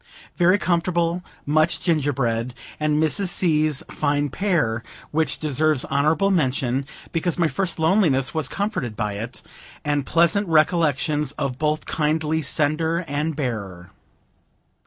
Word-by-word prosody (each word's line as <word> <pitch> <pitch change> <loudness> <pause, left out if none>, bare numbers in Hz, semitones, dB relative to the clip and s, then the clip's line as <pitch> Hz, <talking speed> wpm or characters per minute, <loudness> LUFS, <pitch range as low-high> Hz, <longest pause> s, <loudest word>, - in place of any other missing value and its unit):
Very 180 +2 +4
comfortable; 170 -1 0 0.2
munch 155 +3 +2
gingerbread, 130 -7 0 0.2
and 150 0 +1
Mrs. 160 +5 +1
C.'s 155 -5 +1
fine 145 -1 0
pear, 150 - 0 0.3
which 155 -2 0
deserves 155 -1 +1
honorable 155 +8 +2
mention, 135 -5 0 0.2
because 170 0 -1
my 170 -2 +3
first 180 +5 -1
loneliness 160 -6 +2
was 155 -4 0
comforted 200 - -3
by 105 0 -2
it, 115 +5 -7 0.4
and 145 -1 +1
pleasant 170 +7 +2
recollections 155 -2 +2
of 135 -2 -3
both 155 0 0
kindly 155 +1 0
sender 155 +5 0
and 150 +2 -2
bearer. 100 - -4
155 Hz, 120 wpm, -23 LUFS, 135-170 Hz, 0.4 s, Very